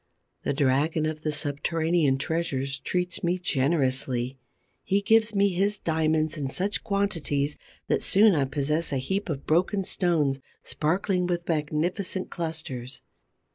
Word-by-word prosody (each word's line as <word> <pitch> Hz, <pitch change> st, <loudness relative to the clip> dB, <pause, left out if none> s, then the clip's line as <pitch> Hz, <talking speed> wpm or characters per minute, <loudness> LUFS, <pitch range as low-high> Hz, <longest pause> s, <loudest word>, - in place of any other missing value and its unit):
The -, -, -1 dB
dragon 145 Hz, +3 st, +2 dB
of 155 Hz, 0 st, -3 dB
the 155 Hz, -, -1 dB
subterranean 150 Hz, 0 st, +1 dB
treasures 135 Hz, -3 st, -2 dB
treats 180 Hz, +2 st, -1 dB
me 175 Hz, +1 st, +1 dB
generously. 130 Hz, -5 st, 0 dB, 0.4 s
He 195 Hz, -, +2 dB
gives 220 Hz, +1 st, +3 dB
me 200 Hz, 0 st, +4 dB
his 200 Hz, +3 st, 0 dB
diamonds 155 Hz, -2 st, 0 dB
in 140 Hz, -, -2 dB
such 195 Hz, +8 st, -1 dB
quantities 165 Hz, -9 st, 0 dB, 0.3 s
that -, -, +1 dB
soon 210 Hz, +1 st, +5 dB
I 145 Hz, -4 st, +2 dB
possess 150 Hz, +4 st, -1 dB
a 140 Hz, -, 0 dB
heap 190 Hz, -, -2 dB
of 140 Hz, -3 st, -4 dB
broken 185 Hz, +5 st, +2 dB
stones 160 Hz, -8 st, +1 dB, 0.2 s
sparkling 180 Hz, +7 st, 0 dB
with 175 Hz, -1 st, -2 dB
magnificent 170 Hz, +5 st, -1 dB
clusters. 140 Hz, -7 st, -4 dB
160 Hz, 135 wpm, -26 LUFS, 140-180 Hz, 0.4 s, soon